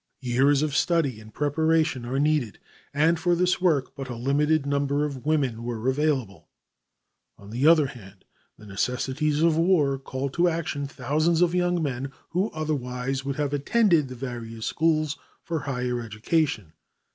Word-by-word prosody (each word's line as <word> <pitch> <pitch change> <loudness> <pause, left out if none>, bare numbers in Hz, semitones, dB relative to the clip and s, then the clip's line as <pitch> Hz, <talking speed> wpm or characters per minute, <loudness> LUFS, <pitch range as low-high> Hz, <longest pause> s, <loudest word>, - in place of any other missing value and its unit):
Years 135 +3 +3
of 150 -2 -1
study 145 -9 +1
and 110 0 -13
preparation 155 -2 +1
are 130 +2 -2
needed, 145 -6 +1 0.3
and 160 +3 +2
for 175 +1 +2
this 180 +1 +1
work 155 -8 +1
but 135 -2 -7
a 120 - -4
limited 145 +5 +1
number 140 +1 0
of 140 -2 -6
women 135 -7 +1
were 120 0 -4
available. 130 - -1 0.9
On 100 +1 -13
the 125 +6 +1
other 160 -3 +6
hand, 105 -8 -11 0.3
the 105 - -14
necessities 130 +8 -1
of 165 -2 +3
war 160 -6 +2
called 135 0 -4
to 175 +1 +3
action 155 -4 -3
thousands 155 +5 +1
of 175 -1 +1
young 175 -1 +1
men 135 -1 -3 0.2
who 185 +5 0
otherwise 135 -4 -3
would 140 0 -3
have 145 -1 -2
attended 165 +1 +3
the 130 - -8
various 115 -3 -6
schools 155 -2 0 0.2
for 165 -2 -2
higher 125 -4 -2
education. 110 - -1
140 Hz, 155 wpm, -25 LUFS, 125-155 Hz, 0.9 s, other